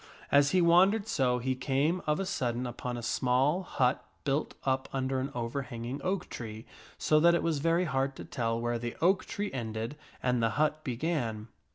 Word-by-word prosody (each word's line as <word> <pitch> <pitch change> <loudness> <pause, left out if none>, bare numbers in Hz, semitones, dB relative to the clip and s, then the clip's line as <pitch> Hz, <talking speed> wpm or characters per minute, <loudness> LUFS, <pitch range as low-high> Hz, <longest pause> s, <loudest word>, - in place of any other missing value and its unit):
As 140 0 +5
he 180 +3 +3
wandered 190 +5 +5
so, 125 - +2
he 130 +2 -1
came 140 +7 0
of 150 0 +2
a 195 - -1
sudden 125 -8 -1
upon 120 0 -4
a 120 - -6
small 130 +9 +2
hut 130 -8 0 0.2
built 140 +1 -1
up 130 0 0
under 130 0 -1
an 135 +2 -2
overhanging 120 +1 -4
oak 185 -1 -1
tree 110 -1 -7 0.3
so 155 - +3
that 170 +2 +6
it - - 0
was 160 -3 +1
very 165 +4 +2
hard 135 -3 0
to - - -8
tell 115 -1 -1
where 120 0 -1
the 120 0 -4
oak 185 +3 +3
tree 205 0 -3
ended 115 +1 -4 0.3
and 125 -1 +2
the 115 - +3
hut 155 0 +1
began. 120 -5 -2
135 Hz, 190 wpm, -30 LUFS, 120-160 Hz, 0.3 s, that